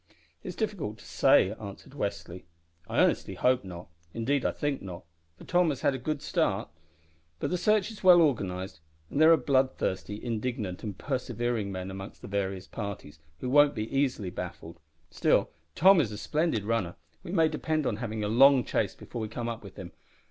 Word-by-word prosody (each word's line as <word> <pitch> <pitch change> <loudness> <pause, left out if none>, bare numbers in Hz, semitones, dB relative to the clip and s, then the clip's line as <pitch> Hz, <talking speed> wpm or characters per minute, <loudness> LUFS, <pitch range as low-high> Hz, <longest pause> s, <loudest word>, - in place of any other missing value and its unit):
"It - - -9
is - - -5
difficult 180 - -3
to - - -16
say," 95 - +4
answered 100 +5 -9
Westly. 90 - -5 0.4
"I - - -3
earnestly - - +2
hope 125 -2 +2
not; 90 -2 -9 0.3
indeed 125 +4 0
I - - +2
think 145 -2 -2
not, 90 -3 -8 0.3
for - - -13
Tom 175 -1 +2
has 140 -4 -3
had - - +2
a 130 - -4
good 150 +3 -3
start; 135 - 0 0.7
but - - -3
the - - +1
search 215 +2 +2
is 215 - -12
well 180 -2 +8
organised, 95 - 0 0.3
and 145 - 0
there 160 +1 +8
are 165 - +7
bloodthirsty, 130 -7 0
indignant, 115 -5 -3
and 105 -4 -6
persevering 120 -5 -2
men 95 0 -5
among 95 +1 -7
the - - -10
various 95 -2 -2
parties, 100 -10 -7 0.2
who 125 - -2
won't 145 +1 +5
be 110 +4 -4
easily 125 -9 0
baffled. 85 -1 -7 0.3
Still - - +2 0.2
Tom 190 0 +7
is 115 -7 -2
a 105 - -6
splendid 150 -3 0
runner. 105 -5 -1 0.3
We 170 - -8
may 165 -4 +4
depend 155 -1 -1
on 105 - -1
having 110 -2 -4
a - - 0
long 130 +4 +6
chase - - -1
before 120 - -7
we 110 - -2
come 115 +2 -5
up 115 -1 -5
with 100 -2 -11
him." 90 -2 -8
115 Hz, 190 wpm, -28 LUFS, 100-145 Hz, 0.7 s, well